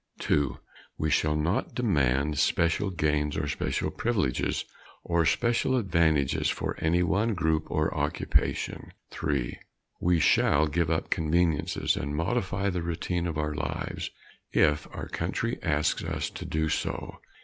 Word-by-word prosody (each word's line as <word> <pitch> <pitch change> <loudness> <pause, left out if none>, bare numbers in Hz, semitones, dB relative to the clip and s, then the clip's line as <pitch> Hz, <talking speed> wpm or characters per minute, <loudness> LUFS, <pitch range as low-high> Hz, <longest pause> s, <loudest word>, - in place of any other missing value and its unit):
2. 75 -1 +1 0.4
We 80 0 0
shall 75 +1 +2
not 80 +6 -1
demand 75 - +1
special 85 +4 +2
gains 75 -4 0
or 75 - -1
special - - -1
privileges 100 - 0 0.4
or 85 -2 +2
special 120 +6 +2
advantages 80 - +2
for - - -2
any 85 +2 +2
one 105 +6 +1
group 80 -2 0
or 75 0 0
occupation. - - -1 0.2
3. 70 -5 -2 0.4
We 90 -1 +3
shall 75 0 +4
give 80 +1 0
up 80 -1 -1
conveniences 80 0 +1
and 70 +2 -3
modify 95 +3 0
the 90 -1 -2
routine 85 +1 -2
of 80 -3 -3
our 75 0 -1
lives 75 0 -3 0.4
if 75 -1 +3
our - - -6
country - - -2
asks 75 +1 +1
us - - -3
to - - -7
do 80 0 0
so. - - -3
80 Hz, 140 wpm, -28 LUFS, 75-90 Hz, 0.4 s, shall